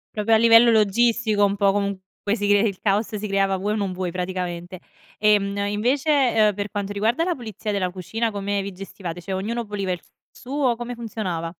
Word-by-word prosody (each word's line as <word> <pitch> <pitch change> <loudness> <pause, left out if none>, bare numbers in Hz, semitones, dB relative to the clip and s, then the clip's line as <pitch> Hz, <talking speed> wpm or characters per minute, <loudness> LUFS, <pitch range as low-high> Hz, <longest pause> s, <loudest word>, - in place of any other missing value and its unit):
Proprio 215 +1 +2
a - - +6
livello 230 +1 +7
logistico 220 0 +3
un 200 0 +1
po' 200 -1 +3
comunque 200 -1 -2 0.3
si 205 -1 -1
cre 205 0 +5
il 195 - -6
caos 210 +2 0
si 210 +1 -4
creava 195 -1 +1
vuoi 205 +3 -1
o - - -1
non 200 -3 -2
vuoi 180 -1 -3
praticamente. 180 -1 -4 0.4
Ehm, 205 -1 +2
invece, 250 +9 0 0.2
ehm, 215 -2 +4
per 205 +1 -4
quanto 205 -1 -3
riguarda 225 +10 +1
la 355 -1 0
pulizia 220 - -5
della 185 -3 -1
cucina 220 +6 -3
come 200 -1 -2
vi 200 - -6
gestivate? 180 -2 -7
Cioè 190 +3 -6
ognuno 225 +5 -2
puliva 200 -2 -3
il 180 - -4
s - - -28 0.2
suo, 260 -2 -1
come 240 +1 -5
funzionava? 190 -8 -4
205 Hz, 200 wpm, -23 LUFS, 195-225 Hz, 0.4 s, livello